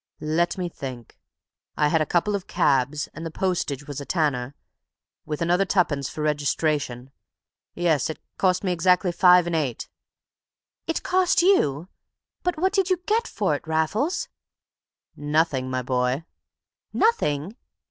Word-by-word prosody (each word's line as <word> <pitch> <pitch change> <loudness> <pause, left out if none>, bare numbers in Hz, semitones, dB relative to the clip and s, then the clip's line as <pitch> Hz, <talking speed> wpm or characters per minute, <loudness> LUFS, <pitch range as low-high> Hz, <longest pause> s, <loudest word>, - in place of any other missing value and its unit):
"Let 160 +4 0
me 180 -1 -2
think. 130 -8 -8 0.6
I 150 -1 +3
had 160 +1 +2
a 155 - 0
couple 180 +7 +1
of 200 -2 -3
cabs, 140 +3 +1
and 165 - -8
the 165 - -4
postage 160 -6 -2
was 145 -1 -6
a - - -5
tanner, 140 -6 -1 0.7
with 155 +1 -2
another 175 +3 +3
twopence 165 -8 0
for 155 - -5
registration. 145 -3 -1 0.6
Yes, 160 -6 +1
it 160 - -4 0.2
cost 185 0 +2
me 185 - 0
exactly 180 +1 +2
five 180 0 +6
and 175 -1 -2
eight." 140 -7 -2 1.0
"It 330 - -2
cost 365 -1 +2
you! 175 - +3 0.5
But 360 -2 -1
what 375 +4 +1
did 390 -2 +2
you 370 - +3
get 455 +2 +1
for 195 -7 -1
it, 145 - -5
Raffles?" 160 - 0 0.9
"Nothing, 145 -3 0
my 130 0 -2
boy." 125 +3 0 0.7
"Nothing!" 195 - +1
160 Hz, 145 wpm, -24 LUFS, 145-185 Hz, 1.0 s, five